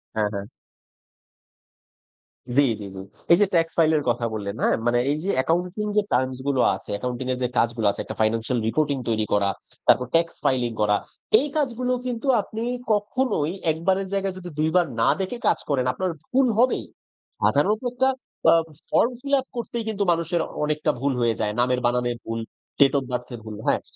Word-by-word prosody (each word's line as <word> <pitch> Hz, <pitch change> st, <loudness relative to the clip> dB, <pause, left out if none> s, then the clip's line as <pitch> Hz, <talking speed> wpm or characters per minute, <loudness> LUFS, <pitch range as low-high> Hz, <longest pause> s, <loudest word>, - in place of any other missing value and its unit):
হ্যাঁ, 105 Hz, -1 st, +2 dB
হ্যাঁ। 100 Hz, 0 st, -4 dB, 2.1 s
জি, -, -, +8 dB, 0.2 s
জি, -, -, -6 dB
জি। -, -, -7 dB, 0.3 s
এই 170 Hz, -, +8 dB
যে -, -, +7 dB
ট্যাক্স 165 Hz, -1 st, +2 dB
ফাইল 160 Hz, -1 st, +5 dB
এর 145 Hz, -, -1 dB
কথা 120 Hz, 0 st, 0 dB
বললেন, 100 Hz, -1 st, -4 dB
হ্যাঁ? -, -, +3 dB
মানে 120 Hz, 0 st, +3 dB
এই 150 Hz, -, 0 dB
যে 195 Hz, -, -2 dB
অ্যাকাউন্টিং 180 Hz, +8 st, 0 dB
যে -, -, +6 dB
টার্মস 130 Hz, 0 st, +1 dB
গুলো 135 Hz, -3 st, +2 dB
আছে, -, -, -12 dB
অ্যাকাউন্টিং 125 Hz, +4 st, -4 dB
এর -, -, -4 dB
যে -, -, +2 dB
কাজগুলো 115 Hz, -2 st, +2 dB
আছে -, -, -5 dB
একটা 110 Hz, -, -7 dB
ফাইন্যান্সিয়াল 115 Hz, +3 st, +1 dB
রিপোর্টিং 145 Hz, +2 st, +1 dB
তৈরি 110 Hz, -1 st, +1 dB
করা, 100 Hz, -1 st, +3 dB, 0.4 s
তারপর 125 Hz, -, +5 dB
ট্যাক্স 165 Hz, 0 st, +2 dB
ফাইলিং 125 Hz, -3 st, +2 dB
করা। 105 Hz, 0 st, +3 dB, 0.4 s
এই 295 Hz, -, -1 dB
কাজগুলো 255 Hz, -3 st, 0 dB
কিন্তু 245 Hz, +2 st, -3 dB
আপনি 220 Hz, +3 st, -6 dB, 0.3 s
কখনোই 210 Hz, -, 0 dB, 0.2 s
১ 155 Hz, -, -4 dB
বারের 190 Hz, 0 st, +2 dB
জায়গায় 195 Hz, -1 st, -1 dB
যদি 180 Hz, -1 st, -7 dB
২ 155 Hz, +1 st, +2 dB
বার 175 Hz, -1 st, +5 dB, 0.2 s
না -, -, +4 dB
দেখে 215 Hz, +6 st, -3 dB
কাজ -, -, +3 dB
করেন, 130 Hz, -3 st, +1 dB
আপনার 185 Hz, -1 st, -2 dB, 0.2 s
ভুল 260 Hz, 0 st, +4 dB
হবেই। 255 Hz, +1 st, +2 dB, 0.6 s
সাধারণত 215 Hz, +2 st, +2 dB
একটা 260 Hz, +2 st, +2 dB, 0.4 s
অ্যা 165 Hz, +1 st, +7 dB, 0.4 s
ফর্ম 240 Hz, -, +4 dB
ফিল 280 Hz, 0 st, -4 dB
আপ 260 Hz, -, -17 dB
করতেই 235 Hz, 0 st, -3 dB
কিন্তু 205 Hz, -2 st, -1 dB
মানুষের 170 Hz, 0 st, 0 dB, 0.2 s
অনেকটা 150 Hz, 0 st, +1 dB
ভুল 140 Hz, 0 st, 0 dB
হয়ে 115 Hz, -2 st, +1 dB
যায়। 105 Hz, -1 st, 0 dB
নামের 125 Hz, +1 st, +2 dB
বানানের 120 Hz, 0 st, +1 dB
ভুল, 115 Hz, 0 st, -3 dB, 0.4 s
ডেট 140 Hz, 0 st, +6 dB
ওফ 135 Hz, -, 0 dB
বার্থ 125 Hz, 0 st, -3 dB
এর -, -, -9 dB
ভুল 105 Hz, -1 st, -7 dB
হ্যাঁ। -, -, +3 dB
150 Hz, 190 wpm, -24 LUFS, 120-195 Hz, 2.1 s, জি